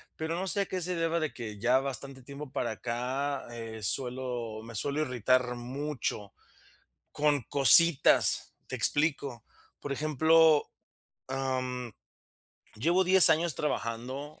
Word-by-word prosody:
pero 160 +1 -4
no 185 +2 -4
sé 200 +2 +1
a 195 - -1
qué 185 - -4
se 180 +1 -3
deba 165 0 -1
de 155 -2 -3
que, 110 -4 -8
ya 125 +4 +2
bastante 135 0 -6
tiempo 140 +1 -10
para 120 - -3
acá, 130 +6 -4
eh, 115 -2 -8
suelo 120 -1 -3
me 115 - -11
suelo 140 +7 -1
irritar 125 -2 0
mucho 125 -4 -5 0.8
con 145 -1 +1
cositas. 140 +5 +5
Te - - -5
explico, 140 -6 0 0.4
por 145 - -7
ejemplo, 155 +2 +3 0.6
am, 130 -2 -4 0.9
llevo 170 - +1
10 185 0 +6
años 160 -2 +2
trabajando 130 +3 -5
135 Hz, 130 wpm, -28 LUFS, 120-155 Hz, 0.9 s, 10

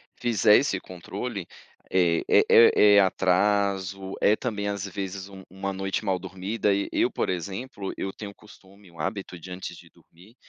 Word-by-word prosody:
fizer 110 -3 +4
esse 100 -9 0
controle, 95 +3 -6 0.5
é 85 -3 +2
é - - +5
é 105 -3 +7
é - - +8
atraso, 95 0 +1
é 105 - +4
também, 105 -5 -3
às 100 -1 -3
vezes, 95 0 -6
um 95 -1 -12
uma 95 +1 -5
noite 95 +2 -3
mal 95 -3 0
dormida 95 +3 -2
e 100 0 -1
eu, - - +1
por - - -2
exemplo, 95 +4 -5
eu 95 - -4
tenho 100 0 -8
o - - -18
costume, 100 -2 -18
o 85 -2 -18
hábito 95 +2 -4
de 90 +2 -11
antes 90 +1 -7
de - - -16
dormir, 95 +8 -21
95 Hz, 175 wpm, -26 LUFS, 95-100 Hz, 0.5 s, é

